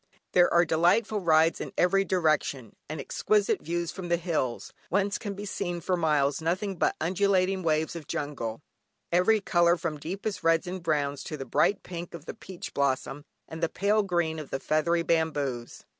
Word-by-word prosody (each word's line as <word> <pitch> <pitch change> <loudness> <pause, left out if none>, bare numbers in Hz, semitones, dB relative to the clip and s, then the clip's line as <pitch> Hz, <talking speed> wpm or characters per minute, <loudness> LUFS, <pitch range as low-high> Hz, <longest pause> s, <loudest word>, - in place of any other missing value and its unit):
There 175 -1 +5
are 175 +1 +5
delightful 175 +7 +2
rides 165 -2 +3
in - - -6
every 195 +2 +3
direction, 155 - 0
and 155 -1 -4
exquisite 205 +8 +1
views 170 +1 -2
from 185 -3 -7
the 170 - +3
hills, 160 -8 -2 0.2
whence 200 +2 +1
can 205 -3 -5
be 205 +1 -6
seen 175 -3 -3
for 180 +2 0
miles 150 -4 +1
nothing 185 +5 -1
but - - +1
undulating 190 +2 +1
waves 160 -1 0
of 160 -4 -8
jungle, 135 -5 -4 0.5
every 180 +5 +4
colour 175 -2 +3
from 155 -2 -4
deepest 195 +5 -4
reds 165 +2 +3
and 180 +1 -5
browns 145 -4 -1
to 155 - -5
the 135 - -6
bright 200 +10 +2
pink 175 -1 -7
of 170 - -10
the - - -6
peach 190 -5 -9
blossom, 140 +1 -1 0.2
and 160 0 -8
the 165 - +1
pale 205 +2 +2
green 170 -5 -1
of 150 - -8
the 135 - -3
feathery 170 +4 +1
bamboos. 145 -8 -1
170 Hz, 180 wpm, -28 LUFS, 155-185 Hz, 0.5 s, There